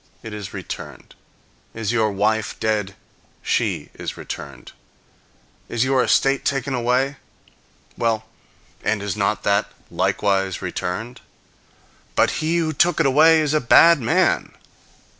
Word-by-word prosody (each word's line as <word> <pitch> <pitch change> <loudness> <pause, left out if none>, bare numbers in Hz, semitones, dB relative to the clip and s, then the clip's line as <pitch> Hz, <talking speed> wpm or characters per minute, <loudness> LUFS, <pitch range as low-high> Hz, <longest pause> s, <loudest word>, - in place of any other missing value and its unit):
It 110 - -8
is 105 -2 -7
returned. - - -8 0.6
Is 110 -2 -2
your 110 -3 +1
wife 110 +2 -1
dead? 105 -3 -1 0.5
She - - -1
is - - -6
returned. - - -8 1.0
Is 115 0 0
your 130 -1 +2
estate 135 0 +2
taken 135 -1 -1
away? 125 +3 0 0.8
Well, 110 -2 -1 0.6
and 105 -1 0
is 100 -1 -3
not 105 0 -1
that 100 +1 +1 0.2
likewise 95 -2 0
returned? 110 +7 -5 0.9
"But - - +3
he 160 +2 +1
who 160 -2 0
took 175 +3 +2
it - - +3
away 155 +4 +5
is 150 -1 0
a 155 - +2
bad 165 +6 +6
man." 115 -2 +1
115 Hz, 125 wpm, -21 LUFS, 105-140 Hz, 1.0 s, bad